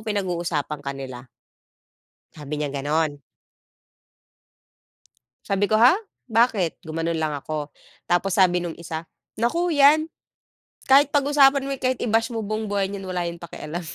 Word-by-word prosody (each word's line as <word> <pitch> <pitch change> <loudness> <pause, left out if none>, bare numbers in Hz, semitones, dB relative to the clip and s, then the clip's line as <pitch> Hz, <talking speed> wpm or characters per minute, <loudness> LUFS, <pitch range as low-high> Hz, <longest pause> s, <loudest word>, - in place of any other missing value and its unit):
pinag-uusapan 175 -8 -2
ka 140 0 -4
nila." 130 -2 -8 1.1
Sabi 150 -1 -6
niya 145 -2 -3
ganun. 145 +1 -1 2.2
Sabi 200 0 +1
ko, 215 - +2
"Ha? 235 +4 +7 0.4
Bakit?" 220 -7 +2
Gumanon 165 +1 -2
lang 155 -2 -1
ako. 150 +1 -5 0.4
Tapos 175 +2 +1
sabi 180 -2 +4
nung 170 - -4
isa, 160 -1 -5 0.3
"Naku 330 +11 0
'yan. 295 +3 +5 0.8
Kahit 275 +2 +6
pag-usapan 280 -1 +4
mo, 275 - -2
kahit 255 -1 +1
i-bash 225 0 +1
mo 225 - -2
buong 215 +1 -3
buhay 200 -1 0
niyan 195 -1 -6
wala 180 -1 -2
yang 170 0 -7
pakialam." 170 0 -6
180 Hz, 135 wpm, -23 LUFS, 155-230 Hz, 2.2 s, Ha